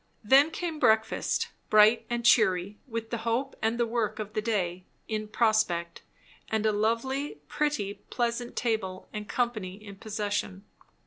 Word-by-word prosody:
Then 270 Hz, +8 st, +6 dB
came 325 Hz, -1 st, -4 dB
breakfast; 220 Hz, -3 st, +2 dB, 0.2 s
bright 215 Hz, +2 st, +5 dB
and 240 Hz, -1 st, -2 dB
cheery, 200 Hz, -3 st, +3 dB
with 230 Hz, -2 st, -5 dB
the 235 Hz, -, -2 dB
hope 235 Hz, +4 st, -1 dB
and 225 Hz, +1 st, +1 dB
the 240 Hz, -, +2 dB
work 230 Hz, -2 st, -1 dB
of 215 Hz, -1 st, -6 dB
the 215 Hz, -, 0 dB
day 185 Hz, -5 st, -1 dB, 0.2 s
in 215 Hz, -1 st, -3 dB
prospect, 210 Hz, -6 st, +1 dB, 0.5 s
and 220 Hz, 0 st, 0 dB
a 215 Hz, -, +4 dB
lively, 230 Hz, +7 st, -1 dB
pretty, 295 Hz, -10 st, -1 dB, 0.2 s
pleasant 240 Hz, 0 st, -2 dB
table 205 Hz, -6 st, -2 dB
and 210 Hz, -1 st, -6 dB
company 215 Hz, -7 st, -1 dB
in 200 Hz, -1 st, -12 dB
possession. 205 Hz, -2 st, -3 dB
220 Hz, 145 wpm, -28 LUFS, 205-235 Hz, 0.5 s, Then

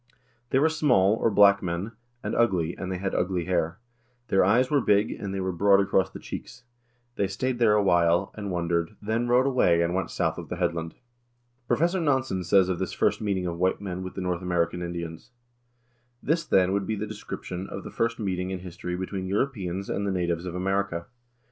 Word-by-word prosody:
They -, -, +2 dB
were 145 Hz, +4 st, +4 dB
small 125 Hz, -11 st, +3 dB
(or 115 Hz, -, +1 dB
black) 100 Hz, -1 st, +6 dB
men,2 90 Hz, +4 st, -3 dB, 0.3 s
and -, -, -3 dB
ugly, 90 Hz, -8 st, +1 dB
and 95 Hz, 0 st, -5 dB
they 95 Hz, -, -2 dB
had 95 Hz, +1 st, -3 dB
ugly 90 Hz, -2 st, 0 dB
hair; 85 Hz, -1 st, 0 dB, 0.5 s
their 95 Hz, -, +4 dB
eyes 120 Hz, +8 st, +3 dB
were 145 Hz, -2 st, +3 dB
big, 105 Hz, -1 st, +3 dB
and 100 Hz, -2 st, -5 dB
they 95 Hz, -, -3 dB
were 95 Hz, 0 st, -1 dB
broad 100 Hz, +3 st, +4 dB
across 95 Hz, -1 st, +2 dB
the -, -, -9 dB
cheeks. 125 Hz, 0 st, -8 dB, 0.5 s
They 100 Hz, -, +1 dB
stayed 120 Hz, +6 st, -2 dB
there 115 Hz, -3 st, +5 dB
awhile, 90 Hz, -2 st, +3 dB
and 105 Hz, -2 st, -5 dB
wondered, 85 Hz, +1 st, -1 dB
then 110 Hz, +3 st, -1 dB
rowed 125 Hz, +2 st, +4 dB
away 90 Hz, -11 st, +3 dB
and 85 Hz, +1 st, -1 dB
went 95 Hz, +1 st, -1 dB
south -, -, -1 dB
of -, -, -9 dB
the -, -, -3 dB
headland." 85 Hz, -2 st, -2 dB, 0.7 s
Professor 175 Hz, +7 st, +2 dB
Nansen 130 Hz, -, 0 dB
says 95 Hz, +1 st, +4 dB
of 90 Hz, -2 st, -2 dB
this -, -, -3 dB
first -, -, +1 dB
meeting 100 Hz, -3 st, -1 dB
of 85 Hz, -1 st, -3 dB
white 95 Hz, +1 st, +1 dB
men 95 Hz, -2 st, -5 dB
with 95 Hz, 0 st, -7 dB
the 95 Hz, -, -4 dB
North 90 Hz, -1 st, -2 dB
American 90 Hz, -1 st, 0 dB
Indians: 85 Hz, 0 st, -6 dB, 0.5 s
" 120 Hz, 0 st, -42 dB
This, 165 Hz, +2 st, +1 dB
then, 95 Hz, 0 st, +3 dB
would 100 Hz, -1 st, -1 dB
be 110 Hz, -, -1 dB
the 105 Hz, -, -3 dB
description 100 Hz, -3 st, -6 dB
of 100 Hz, -, -6 dB
the -, -, -8 dB
first 115 Hz, 0 st, -1 dB
meeting 95 Hz, -4 st, -2 dB
in 95 Hz, -1 st, -4 dB
history 90 Hz, 0 st, -5 dB
between 95 Hz, +1 st, -4 dB
Europeans 100 Hz, -4 st, -2 dB
and 100 Hz, 0 st, -2 dB
the -, -, 0 dB
natives 85 Hz, -1 st, -1 dB
of 90 Hz, -, -5 dB
America. 95 Hz, -2 st, -1 dB
95 Hz, 205 wpm, -26 LUFS, 90-110 Hz, 0.7 s, black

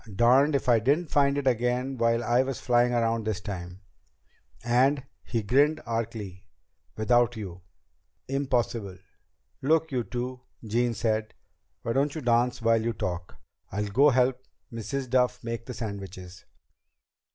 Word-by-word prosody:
Darned 130 Hz, +7 st, +4 dB
if 135 Hz, -, -1 dB
I 120 Hz, -2 st, +5 dB
didn't 145 Hz, +8 st, +1 dB
find 140 Hz, -1 st, +3 dB
it 140 Hz, -, -2 dB
again 125 Hz, +2 st, +1 dB
while 115 Hz, -1 st, +1 dB
I 120 Hz, +1 st, +3 dB
was 135 Hz, -1 st, -3 dB
flying 120 Hz, 0 st, +3 dB
around 115 Hz, -1 st, +1 dB
this 110 Hz, -2 st, -2 dB
time. 90 Hz, -3 st, -7 dB, 0.8 s
And" 130 Hz, +4 st, +3 dB, 0.2 s
he 115 Hz, -3 st, -2 dB
grinned 145 Hz, +8 st, +3 dB
archly 110 Hz, -5 st, -4 dB, 0.5 s
"without 120 Hz, +2 st, +3 dB
you!" 95 Hz, -4 st, -7 dB, 0.7 s
"Impossible!" 120 Hz, -8 st, -1 dB, 0.6 s
"Look, 160 Hz, +3 st, +2 dB
you 125 Hz, -3 st, 0 dB
two," 125 Hz, +2 st, -5 dB, 0.2 s
Jean 120 Hz, +2 st, 0 dB
said. 110 Hz, 0 st, -1 dB, 0.5 s
"Why 115 Hz, -, -1 dB
don't 140 Hz, +3 st, +1 dB
you 155 Hz, -, -4 dB
dance 120 Hz, 0 st, +1 dB
while 115 Hz, 0 st, +3 dB
you 115 Hz, +1 st, -1 dB
talk? 90 Hz, -4 st, -4 dB, 0.4 s
I'll 105 Hz, +1 st, -2 dB
go 135 Hz, +9 st, +5 dB
help 130 Hz, 0 st, +2 dB, 0.3 s
Mrs. 130 Hz, +4 st, -4 dB
Duff 125 Hz, 0 st, +1 dB
make 115 Hz, 0 st, -5 dB
the 125 Hz, -, -5 dB
sandwiches." 95 Hz, -5 st, -7 dB
120 Hz, 140 wpm, -27 LUFS, 110-130 Hz, 0.8 s, I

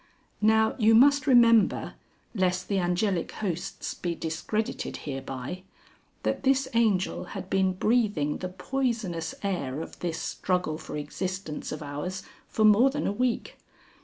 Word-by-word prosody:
(Now 220 Hz, +1 st, +4 dB
you 220 Hz, 0 st, +5 dB
must 285 Hz, +4 st, +5 dB
remember 230 Hz, -4 st, +5 dB, 0.4 s
lest 185 Hz, -3 st, 0 dB
the 200 Hz, -2 st, +1 dB
Angelic 180 Hz, 0 st, 0 dB
Hosts 180 Hz, -5 st, -4 dB
be 175 Hz, -1 st, -3 dB
discredited 165 Hz, +8 st, -3 dB
hereby 135 Hz, +4 st, -5 dB, 0.6 s
that -, -, -1 dB
this 270 Hz, 0 st, +2 dB
Angel 215 Hz, -5 st, +1 dB
had 190 Hz, -, -7 dB
been 190 Hz, -1 st, +2 dB
breathing 200 Hz, -8 st, +1 dB
the 185 Hz, -, -4 dB
poisonous 190 Hz, -5 st, -2 dB
air 155 Hz, -9 st, -2 dB
of 165 Hz, -, -8 dB
this 170 Hz, -2 st, -2 dB
Struggle 180 Hz, -5 st, -1 dB
for -, -, -6 dB
Existence 180 Hz, +2 st, -4 dB
of 155 Hz, 0 st, -5 dB
ours 150 Hz, +7 st, -5 dB, 0.2 s
for 215 Hz, -, +1 dB
more 215 Hz, +5 st, +6 dB
than 290 Hz, +2 st, -3 dB
a -, -, +1 dB
week. 250 Hz, +2 st, -1 dB
190 Hz, 135 wpm, -27 LUFS, 170-225 Hz, 0.6 s, more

